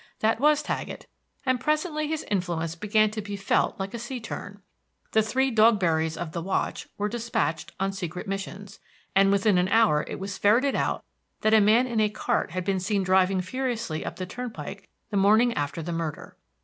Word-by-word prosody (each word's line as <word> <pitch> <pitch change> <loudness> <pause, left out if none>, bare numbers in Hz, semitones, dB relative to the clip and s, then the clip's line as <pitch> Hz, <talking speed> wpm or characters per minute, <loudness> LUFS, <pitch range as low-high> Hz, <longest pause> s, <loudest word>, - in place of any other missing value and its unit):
That 220 +1 +2
was 300 +2 +4
Taggett; - - -4 0.4
and 255 -1 +2
presently 305 +2 0
his 315 0 -2
influence 170 -4 -2
began 210 +4 +2
to 215 0 -4
be 205 0 -5
felt 195 0 0
like 195 0 -4
a 235 - -4
sea 245 +2 -5
turn. 205 -3 -8 0.5
The 220 - +4
three 260 +5 +1
Dogberrys 175 -8 +3
of 170 -2 -4
the 170 - -4
watch 190 +3 -2
were 205 - 0
dispatched 220 -8 -2
on 195 0 0
secret 180 -2 -5
missions, 195 0 -6 0.4
and 195 0 +5
within 200 -1 +3
an 180 - +2
hour 210 -8 +4
it - - -5
was 195 0 -5
ferreted 240 +7 +4
out - - -1 0.4
that 215 - +3
a 220 - +7
man 220 +5 +5
in 235 -3 -1
a 215 -1 +3
cart 210 - -1
had 180 +2 -4
been 195 -1 +1
seen 195 +1 0
driving 185 0 +3
furiously 230 -5 -3
up - - -5
the 185 - -4
turnpike 240 +5 -7 0.2
the 205 - 0
morning 215 +5 +4
after 145 +1 -3
the 170 +2 -4
murder. 165 -3 -4
205 Hz, 190 wpm, -26 LUFS, 185-230 Hz, 0.5 s, a